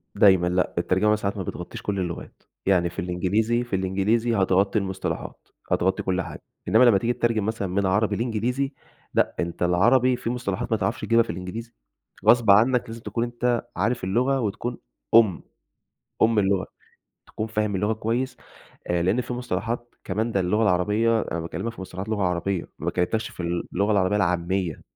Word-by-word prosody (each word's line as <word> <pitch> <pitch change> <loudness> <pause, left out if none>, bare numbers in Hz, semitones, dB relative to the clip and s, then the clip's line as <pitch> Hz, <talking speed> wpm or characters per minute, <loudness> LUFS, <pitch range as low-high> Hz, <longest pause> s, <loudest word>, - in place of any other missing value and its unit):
دايمًا 95 -3 +5
لأ، 90 +1 0
الترجمة 95 +5 +2
ساعات 100 -1 -3
ما 95 - -2
بتغطّيش 90 0 -7
كُلّ 100 -2 -2
اللغات، 85 -2 -6 0.2
يعني 90 -3 +3
في 90 - -8
الإنجليزي 100 +7 0
في 120 -5 -3
الإنجليزي 100 +5 +1
هتغطّي 95 +2 +2
المصطلحات، 95 -1 -5 0.2
هتغطّي 95 +2 +1
كل 95 0 0
حاجة، - - -8 0.3
إنّما 110 +7 +5
لمّا 115 -5 +6
تيجي 120 +5 0
تترجم 115 -4 0
مثلًا 110 -3 -2
من 100 +2 0
عربي 100 +2 +2
لإنجليزي، 125 +5 -1 0.4
لأ، - - +1
أنت 85 +1 -2
العربي 120 +9 +4
فيه 120 -1 -3
مصطلحات 120 -7 -3
ما - - +3
تعرفش - - -2
تجيبها 115 0 +4
في - - -15
الإنجليزي، 95 +7 -6 0.5
غصب 120 -4 +6
عنَّك 120 +5 +5
لازم 115 0 -8
تكون 115 0 -2
أنت 120 0 -1
عارف 105 +3 0
اللغة 125 +8 +1
وتكون 115 +2 -3 0.4
أُم، 105 -7 +5 0.8
أُم 110 -1 +4
اللغة 95 -1 +1 0.6
تكون 110 - -4
فاهم 105 -2 -1
اللغة 105 +3 +1
كويس 120 +4 -2 0.5
آآ، 85 -1 0
لأن 100 +8 +2
فيه 125 - -4
مصطلحات 120 +1 -3
كمان 110 +4 -1
ده 95 - +1
اللغة 105 +5 +1
العربية 105 +4 +2
أنا 85 - -3
باكلمك 90 +8 -4
في 110 - -12
مصطلحات 95 +2 -6
لغة 105 -3 -1
عربية، 90 0 -1
ما - - -2
كلّمتَكش 110 +6 -1
في - - -11
ال 85 0 -2
اللغة 100 +3 +1
العربية 100 0 +2
العاميّة، 90 -2 0
105 Hz, 175 wpm, -24 LUFS, 95-115 Hz, 0.8 s, لمّا